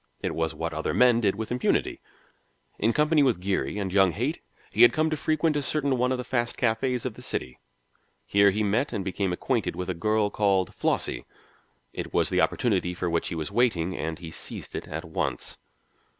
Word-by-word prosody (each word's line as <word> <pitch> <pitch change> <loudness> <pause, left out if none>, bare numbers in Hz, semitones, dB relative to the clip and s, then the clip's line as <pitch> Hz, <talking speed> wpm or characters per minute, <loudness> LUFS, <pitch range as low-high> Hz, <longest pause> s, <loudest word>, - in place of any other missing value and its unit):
It - - -2
was 80 -1 -1
what 80 +1 -3
other 80 0 -2
men 125 -2 +5
did 100 -3 +2
with 110 +2 -5
impunity. 125 0 0 0.8
In 110 - +3
company 150 +3 +3
with 130 -8 +3
Geary 95 +2 -1
and 95 -3 -3
young 95 -3 +4
Haight 130 - -2 0.3
he - - +1
had 120 - +8
come 160 0 +1
to - - +1
frequent 155 +1 +1
a 145 - +1
certain 140 -1 0
one 125 +1 +1
of 130 - +1
the 125 - -4
fast 120 -2 -1
cafés 120 +1 0
of 125 - -2
the - - -13
city. 65 0 -4 0.7
Here 100 0 +5
he 105 +2 0
met 105 +7 0
and 100 -4 -3
became 95 0 -1
acquainted 90 - -1
with 90 0 -3
a - - -2
girl 105 +3 +1
called 100 -4 +1
Flossie. - - -1 0.7
It - - -6
was - - +3
the - - +2
opportunity 95 -7 +1
for 85 -1 -2
which 85 - 0
he - - -3
was 80 -2 -4
waiting, 95 -8 +1
and 80 0 -3
he 85 -2 -9
seized - - -7
it - - -5
at 80 +2 -5
once. 80 - -3
105 Hz, 205 wpm, -26 LUFS, 90-125 Hz, 0.8 s, had